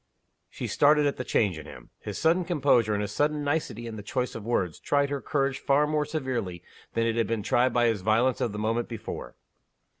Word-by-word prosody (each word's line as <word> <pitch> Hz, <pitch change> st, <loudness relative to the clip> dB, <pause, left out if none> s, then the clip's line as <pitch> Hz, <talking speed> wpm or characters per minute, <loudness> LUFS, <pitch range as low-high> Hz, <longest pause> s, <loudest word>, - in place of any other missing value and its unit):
She -, -, -6 dB
started 150 Hz, 0 st, +4 dB
at 140 Hz, -, 0 dB
the 125 Hz, -, -3 dB
change 95 Hz, -9 st, +1 dB
in 80 Hz, -, -10 dB
him. -, -, -12 dB
His 105 Hz, -, -6 dB
sudden 170 Hz, +3 st, +3 dB
composure, 140 Hz, -10 st, +2 dB
and 105 Hz, -, -1 dB
his 100 Hz, -, -4 dB
sudden 150 Hz, +5 st, 0 dB
nicety 145 Hz, -5 st, -2 dB
in 115 Hz, -1 st, -6 dB
the -, -, -6 dB
choice 125 Hz, +5 st, -2 dB
of 115 Hz, -, -7 dB
words, 95 Hz, -8 st, -1 dB
tried 140 Hz, 0 st, +1 dB
her 140 Hz, -1 st, -2 dB
courage 135 Hz, -3 st, 0 dB
far 140 Hz, +1 st, +3 dB
more 150 Hz, 0 st, 0 dB
severely 130 Hz, -, -3 dB, 0.3 s
than 115 Hz, 0 st, +2 dB
it 115 Hz, -1 st, 0 dB
had 115 Hz, -, +2 dB
been 115 Hz, -2 st, -2 dB
tried 125 Hz, +5 st, +2 dB
by 120 Hz, -1 st, +2 dB
his 115 Hz, -4 st, +1 dB
violence 115 Hz, +5 st, +2 dB
of 115 Hz, -, 0 dB
the 105 Hz, -, -6 dB
moment 115 Hz, +3 st, -1 dB
before. 110 Hz, -, -7 dB
120 Hz, 220 wpm, -27 LUFS, 110-145 Hz, 0.3 s, started